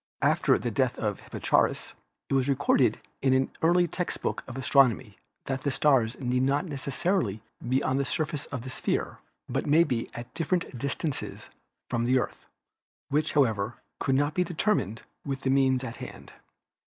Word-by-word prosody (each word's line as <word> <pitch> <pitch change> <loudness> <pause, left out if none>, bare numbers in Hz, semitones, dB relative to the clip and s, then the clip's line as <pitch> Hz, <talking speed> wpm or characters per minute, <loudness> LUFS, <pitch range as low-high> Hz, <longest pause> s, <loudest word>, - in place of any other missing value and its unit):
After - - +4
the - - -3
death - - +1
of - - -2
Hipparchus - - 0 0.3
it - - -3
was 135 0 +2
recorded 140 +1 +3 0.2
in 130 -1 +4
an 130 0 +1
early 175 +2 +4
text 180 +1 -3
book - - -1
of 130 0 -7
astronomy 130 - +3 0.3
that 135 -1 -2
the 140 - 0
stars 130 -5 +2
need 125 -1 0
not 140 +6 +2
necessarily 140 - -1 0.3
be 130 +2 +2
on 130 - +1
the 140 - +2
surface 150 0 -2
of 130 -4 -5
the 130 - -6
sphere, - - -2 0.3
but 135 +4 -2
may 155 +3 +6
be 125 -8 -2
at 120 +1 -8
different 170 -3 -1
distances 140 +3 -4 0.4
from 120 -1 -1
the 130 +2 +4
Earth, 125 - -3 0.6
which, 150 +2 +1
however, 115 -6 +2 0.2
could 135 - +1
not 145 +2 +2
be 180 - +2
determined 160 - 0 0.2
with 135 -2 -3
the 130 - +1
means 135 -1 +3
at 115 -2 -6
hand. - - -9
135 Hz, 170 wpm, -28 LUFS, 125-150 Hz, 0.6 s, may